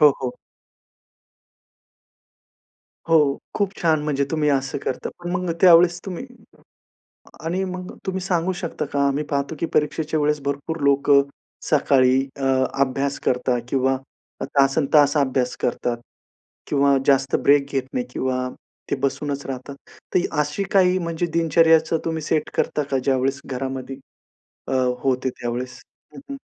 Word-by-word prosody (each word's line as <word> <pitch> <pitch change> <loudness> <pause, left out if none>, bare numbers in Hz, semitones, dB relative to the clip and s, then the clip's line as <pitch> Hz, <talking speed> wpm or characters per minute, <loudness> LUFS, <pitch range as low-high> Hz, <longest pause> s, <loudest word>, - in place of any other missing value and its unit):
हो, 150 -1 +8
हो. 125 -1 -2 2.8
हो, 150 -4 +4 0.2
खूप 200 -2 +1
छान, 160 -3 +2
म्हणजे 145 -2 0
तुम्ही 155 -2 +1
असं 135 0 -1
करता, 130 - -3
पण 175 0 -6
मग 180 0 -1
त्यावेळेस 175 -1 +6
तुम्ही 190 +4 -5 1.2
आणि 180 +4 -1
मग 185 0 -6
तुम्ही 190 -1 -2
सांगू 180 -1 0
शकता 170 - -4
का 140 - 0
आम्ही 140 +2 0
पाहतो, 140 +1 -2
की - - 0
परीक्षेच्या 155 +1 0
वेळेस 150 0 +1
भरपूर 140 +3 -3
लोकं 140 0 +5 0.5
सकाळी 130 -3 +4 0.2
अ, 135 - -3 0.4
अभ्यास 135 +1 0
करतात 125 -1 +1
किंवा 130 0 +1 0.4
अ, - - -1
तासंतास 140 +1 +3
अभ्यास 130 -3 0
करतात 120 0 -1 0.7
किंवा 140 -1 +3
जास्त 135 -1 +3
ब्रेक 140 0 +3
घेत 135 -1 +1
नाही 125 -1 -2
किंवा 130 0 -2 0.4
ते - - +1
बसूनच 140 +1 -2
राहतात. 135 +1 -6 0.4
तर - - +5 0.2
अशी 150 +6 -1
काही 185 -1 +4
म्हणजे 170 -1 -2
दिनचर्याचं 165 0 +3
तुम्ही 160 -1 -2
सेट 155 +1 -1
करता 150 - 0
का, 135 - +1
ज्यावेळेस 135 +1 0
घरामध्ये 130 0 -5 0.7
अ, - - -2 0.3
होते 130 -1 +1
त्यावेळेस? 125 +1 -4 0.3
हं, - - -9
हं. 275 - -5
140 Hz, 135 wpm, -22 LUFS, 135-165 Hz, 2.8 s, हो